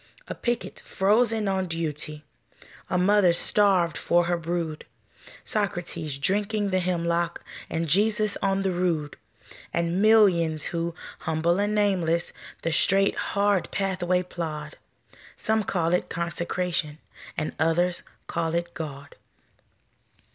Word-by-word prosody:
A - - -4
picket 240 0 -3
frozen 215 +2 +1
on 190 -1 0
duty, 150 -2 -4 0.7
A - - +1
mother 185 -1 +4
starved 185 -3 +3
for 175 0 +2
her 175 +1 0
brood, 165 -2 -3 0.6
Socrates 170 -7 -2
drinking 205 +6 0
the 185 - +2
hemlock, 170 -1 -1 0.3
And 165 +1 -2
Jesus 210 +5 +3
on 195 0 +1
the 190 - +1
rood; 170 -5 -1 0.6
And 170 +2 0
millions 185 -8 +4
who, 170 0 -3 0.2
humble 165 +3 0
and 205 +1 +1
nameless, 180 -5 +1 0.3
The 165 - 0
straight, 195 +5 +4
hard 200 -2 +1
pathway 185 -2 0
plod, 155 -4 -5 0.6
Some 220 0 0
call 170 -4 0
it 180 - 0
Consecration, 170 -2 -2 0.4
And 155 - -2
others 170 +3 +1 0.2
call 165 -1 -2
it 170 0 -2
God. 140 -3 -7
175 Hz, 120 wpm, -26 LUFS, 165-195 Hz, 0.7 s, mother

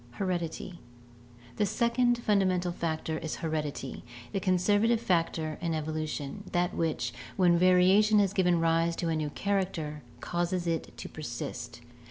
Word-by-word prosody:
Heredity. 180 0 -3 0.4
— 120 0 -22
The 210 - +3
second 240 +3 +2
fundamental 190 -5 +1
factor 160 -2 -2
is 160 - -4
heredity, 150 -4 -4 0.3
the 195 - +1
conservative 205 +5 +3
factor 165 -6 0
in 165 -2 -1
evolution, 155 +2 -4
that 175 0 +1
which, 135 -8 -1 0.2
when 180 -3 +5
variation 185 +4 +5
has 200 -2 +3
given 180 -4 +3
rise 165 0 +2
to 170 - -2
a 160 - +1
new 155 -1 -1
character, 170 -5 -2 0.2
causes 175 +1 -1
it 165 -2 -2
to - - -6
persist. 120 -4 -6
170 Hz, 140 wpm, -29 LUFS, 155-190 Hz, 0.4 s, when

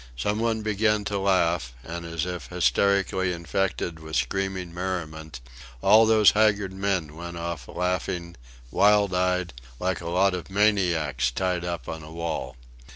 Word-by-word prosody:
Some 105 - -1
one 115 -1 0
began 105 0 +1
to 100 -1 -1
laugh, 85 -9 +1
and, 85 +3 -6
as 85 -1 -2
if 90 -1 -5
hysterically 95 +1 +1
infected 85 -1 -2
with 80 0 -7
screaming 95 +1 -1
merriment, 80 -6 -5 0.4
all 110 +3 +7
those 110 -2 +6
haggard 105 -3 +2
men 95 -6 -1
went 85 +1 -7
off 85 -6 -5
laughing, 90 -1 -2 0.4
wild 100 +2 +4
eyed, 90 -2 0 0.3
like 95 0 -1
a 85 - -5
lot 95 +2 +3
of 90 0 -5
maniacs 90 -11 +2
tied 90 +7 -1
up 85 -7 -4
on 80 0 -5
a 75 +1 -11
wall. 80 -6 -4
90 Hz, 150 wpm, -25 LUFS, 85-100 Hz, 0.4 s, all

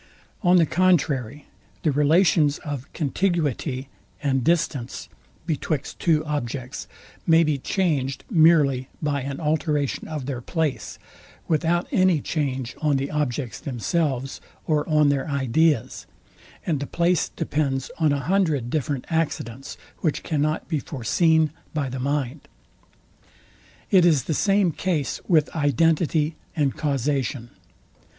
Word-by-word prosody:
On 180 -1 +5
the 170 - +5
contrary, 150 -7 +1 0.4
the 155 - +3
relations 150 0 +3
of 145 -2 -5
contiguity 150 - -1 0.4
and 135 -3 +1
distance 150 -6 -1 0.4
betwixt 155 -3 -3
two 155 -2 +2
objects 135 -3 -4 0.4
may 165 0 +6
be 150 -3 0
changed 140 -6 -1
merely 155 - +4
by 145 -2 -1
an 135 +1 -5
alteration 150 -2 -1
of 150 -4 -5
their 130 -3 -4
place, 160 +1 -2 0.5
without 170 +2 +1
any 185 -4 +3
change 135 -4 -3
on 150 -2 +2
the 135 +1 -3
objects 140 -4 -2
themselves 135 - -2 0.2
or 150 -1 0
on 150 -1 +4
their 140 +2 0
ideas; 140 0 +1 0.6
and 155 -5 0
the 140 - -4
place 170 0 +1
depends 135 -3 -2
on 155 -3 +3
a 140 -1 0
hundred 155 -11 +1
different 145 -3 -2
accidents, 135 -6 -2 0.2
which 155 -4 -1
cannot 155 0 -1
be 155 -4 -1
foreseen 160 +4 +1 0.2
by 140 -3 -1
the 130 +1 -5
mind. 140 +1 -2 1.4
It 185 -3 +6
is 155 -7 +4
the 160 - -2
same 195 +1 +2
case 160 -4 -2
with 155 -4 +2
identity 155 +1 +2 0.2
and 145 -5 +1
causation. 135 -3 -1
150 Hz, 125 wpm, -24 LUFS, 135-165 Hz, 1.4 s, may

